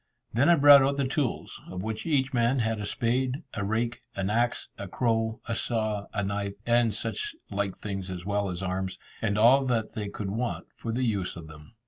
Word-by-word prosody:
Then 130 +8 +4
I 170 - +8
brought 145 -2 +9
out 140 +1 +2
the 140 - +1
tools, 135 -1 -2
of 90 0 -5
which 110 - -4
each 135 -4 +1
man 120 +2 +2
had 115 -2 0
a 105 - -3
spade, 125 +7 0
a 100 - -2
rake, 115 +3 -1
an 100 +1 -1
axe, 120 +2 +1
a 100 - -6
crow, 115 +1 0
a 115 - -1
saw, 110 -3 -1
a 100 -2 -1
knife 100 0 -2
and 120 -1 +3
such 415 - -3 0.2
like 100 -1 -2
things 95 -2 -5
as 90 -1 -6
well 100 0 0
as 90 +1 -4
arms, 95 0 -2 0.2
and 105 -2 0
all 125 +5 +6
that 115 -3 0
they 105 -4 -4
could 100 -1 -4
want 120 +3 -2
for 115 - -4
the 125 +3 -1
use 100 -5 -1
of 85 -2 -8
them. 80 +6 -14
110 Hz, 210 wpm, -28 LUFS, 100-125 Hz, 0.2 s, brought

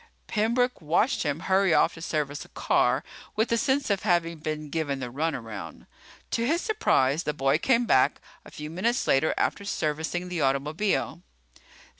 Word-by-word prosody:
Pembroke 235 +2 0
watched 170 - +1
him 150 0 -1
hurry 190 -2 +3
off - - +3
to 165 - -11
service 150 -3 -2
a - - -17
car - - +1 0.3
with 220 +2 0
a - - +4
sense 270 -2 +1
of 195 -2 +1
having 170 -4 +1
been 155 -1 -4
given 145 -4 -2
the 125 -2 -5
runaround. 115 - -4 0.5
To 230 - 0
his 330 +4 +2
surprise, 155 - +2
the 150 -4 -3
boy 135 +2 +2
came 240 +3 +2
back - - +3 0.2
a - - -13
few 150 +1 -8
minutes 230 +9 0
later 135 +4 +2
after - - 0
servicing 160 -1 -2
the 180 -3 -3
automobile. 150 +8 0
165 Hz, 165 wpm, -27 LUFS, 150-210 Hz, 0.5 s, a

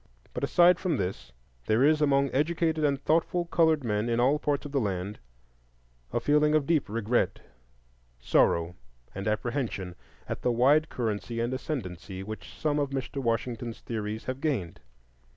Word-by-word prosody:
But - - -4
aside 175 0 +5
from 170 -6 0
this, 95 - -4 0.4
there 110 +4 +3
is 155 +1 +4
among 140 -1 +3
educated 160 +2 +1
and 140 -2 +2
thoughtful 165 +3 +1
colored 160 -3 +2
men 105 0 -1
in 115 0 +1
all 135 +5 +3
parts 145 -1 -1
of 145 - -6
the 140 - +1
land 100 -1 -3 0.9
a - - 0
feeling 150 +1 +3
of 150 -2 +2
deep 155 -6 +1
regret, 115 +2 0 0.8
sorrow, 85 +7 +2 0.4
and 100 +2 -5
apprehension 110 -4 -2 0.3
at - - -4
the 125 - +1
wide 140 +7 +4
currency 115 0 -3
and 120 +2 -1
ascendancy 95 - -5
which 110 +2 -8
some 150 -1 0
of 140 -1 0
Mr. 135 0 -4
Washington's 115 -1 -2
theories 110 -1 -4
have 130 +1 -5
gained. 115 - -2
130 Hz, 155 wpm, -28 LUFS, 110-150 Hz, 0.9 s, aside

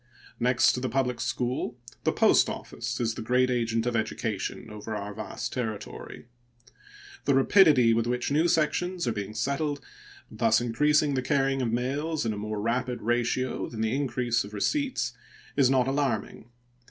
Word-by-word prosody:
Next 125 +1 +4
to - - -3
the 130 0 -2
public 125 0 0
school, 120 +1 -2 0.3
the - - +4
post - - +4
office - - -5
is 115 -2 0
the 115 - -6
great 125 +3 +2
agent 115 -2 0
of 120 -1 -1
education 110 -2 -3
over 105 +1 -6
our 105 0 -5
vast 110 +1 -5
territory. 110 -5 -5 1.0
The 140 - +3
rapidity 135 - +5
with 115 0 +1
which 125 +2 -1
new 155 +4 +3
sections 175 +1 0
are - - +2
being 105 -1 -5
settled, 140 +4 -1 0.5
thus 110 -1 +3
increasing 150 +5 +2
the 130 - 0
carrying 135 0 +1
of 120 -3 0
mails 140 +5 -1
in 110 - 0
a - - -5
more 105 0 -4
rapid 120 +3 -1
ratio 120 +2 0
than 110 -2 -5
the 110 +3 0
increase 125 -4 0
of 105 +1 -9
receipts, 250 - 0 0.4
is 135 -3 +4
not 130 -1 +3
alarming. 135 -5 -2
125 Hz, 165 wpm, -27 LUFS, 115-135 Hz, 1.0 s, rapidity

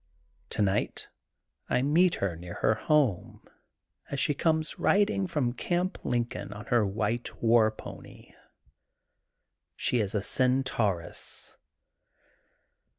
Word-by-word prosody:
Tonight 100 -1 -1 0.6
I 125 - +2
meet 170 +5 +3
her 95 -4 -2
near 85 +1 -9
her 110 - +2
home 130 - 0 0.6
as 140 - -3
she 145 - +2
comes 155 +1 0
riding 200 -1 +2
from 145 -8 0
Gamp 175 +8 -2
Lincoln 120 -4 -2
on 105 +1 -9
her 120 -2 +4
wjiite 105 +4 -2
war 115 -1 +4
pony. 110 - -11 1.4
She 125 - +1
is 105 -1 -1
a 105 - +1
cen 130 +3 +3
tauress. 100 -9 -1
120 Hz, 110 wpm, -28 LUFS, 105-150 Hz, 1.4 s, her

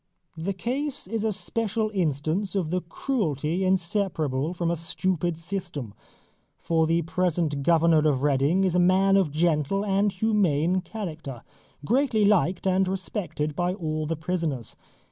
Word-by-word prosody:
The 170 +5 -3
case 265 +9 -3
is 220 +3 -3
a 220 - +1
special 215 +4 -2
instance 170 +3 -1
of 175 -5 -1
the 180 0 0
cruelty 170 - -1
inseparable 170 -6 0
from 170 -1 0
a - - +1
stupid 175 0 -1
system, 165 - -5 0.6
for 160 -1 +1
the 165 +1 +2
present 165 -4 0
Governor 160 0 +4
of 135 -2 0
Reading 145 +6 +2
is 185 -3 +1
a - - +4
man 190 +2 +4
of 190 -5 +3
gentle 160 +5 +1
and 200 +1 +2
humane 185 -4 +1
character, 165 - -7 0.4
greatly 235 - +2
liked 185 -3 +2
and 190 0 +2
respected 175 -6 -3
by 175 +2 0
all 155 -4 -3
the 165 - -1
prisoners. 160 - -3
175 Hz, 145 wpm, -26 LUFS, 155-195 Hz, 0.6 s, Governor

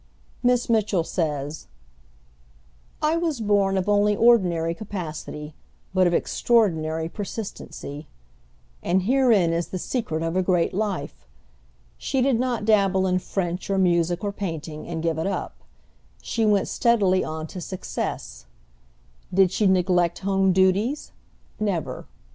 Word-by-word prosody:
Miss 245 -1 +2
Mitchell 215 -6 +2
says, 150 -3 -3 1.4
"I 310 +2 +2
was 330 -6 -1
born 200 -3 +2
of 185 - -1
only 205 0 +3
ordinary 180 -8 +3
capacity, 155 -6 -6 0.4
but 185 -1 +4
of 175 - +1
extraordinary 160 -9 +1
persistency," 185 -7 -7 0.7
and 185 +1 +1
herein 225 -7 +3
is 170 0 -1
the 185 - -5
secret 175 -6 -2
of 165 +1 -2
a 185 - +3
great 180 -2 +1
life. 180 - -3 0.7
She 265 - -1
did 255 -2 +2
not 245 -4 -1
dabble 195 -3 +3
in 185 0 +1
French 180 0 -3
or 195 - +1
music 175 -1 +2
or 205 - -1
painting 165 -6 -5
and 165 -1 -4
give 165 -1 0
it 160 - -1
up; 195 -2 -4 0.6
she 220 - -1
went 205 -2 +3
steadily 200 -6 +2
on 155 0 -4
to 180 +3 -8
success. 60 - -5 0.8
Did 185 -1 +4
she 205 +1 +2
neglect 180 -2 +2
home 195 -1 +3
duties? 190 +9 +1 0.5
Never. 200 -7 -2
190 Hz, 130 wpm, -24 LUFS, 165-210 Hz, 1.4 s, but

